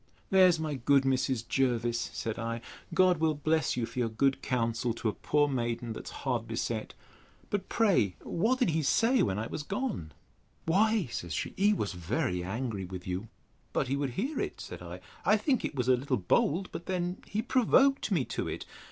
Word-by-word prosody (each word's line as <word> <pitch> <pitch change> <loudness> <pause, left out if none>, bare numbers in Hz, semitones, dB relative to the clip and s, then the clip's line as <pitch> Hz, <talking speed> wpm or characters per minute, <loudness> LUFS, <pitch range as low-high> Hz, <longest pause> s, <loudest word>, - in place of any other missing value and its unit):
There's 185 -3 +6
my 155 -2 -2
good 135 +1 +3
Mrs. 130 -3 0
Jervis! 120 -3 0
said 110 +1 -4
I; 115 0 -3 0.3
God 180 0 +4
will 160 -1 +2
bless 155 -1 +1
you 120 - 0
for 115 +2 -6
your 120 -2 +1
good 135 +5 +1
counsel 115 -1 0
to 115 - -1
a - - -2
poor 145 -1 +2
maiden, 120 -3 -2
that - - -8
is - - -6
hard - - 0
beset. - - -3 0.6
But 200 -2 -2
pray 185 - +3
what 225 +9 +1
did 250 -10 +2
he 160 +1 +1
say, 230 - +3
when 95 - +1
I 110 - -2
was 150 - -4
gone? 195 - -3 0.5
Why, 210 +4 +3
says 85 -2 -4
she, - - -3
he 205 +2 +4
was 105 - -2
very 90 - -1
angry 105 +1 -3
with 90 0 -7
you. 95 +4 -3 0.5
But - - 0
he 135 - +1
would 140 -3 -2
hear 270 +9 -1
it! - - -3
said - - -8
I: - - -8 0.2
I 215 - +5
think 255 +4 +1
it - - -3
was 125 -2 -1
a 130 - +6
little 130 0 -1
bold; 150 - +1
but 170 - -7
then 180 0 -1
he 215 +2 -2
provoked 265 +2 +3
me 160 -10 +2
to - - -3
it. - - -5
135 Hz, 200 wpm, -30 LUFS, 115-185 Hz, 0.6 s, There's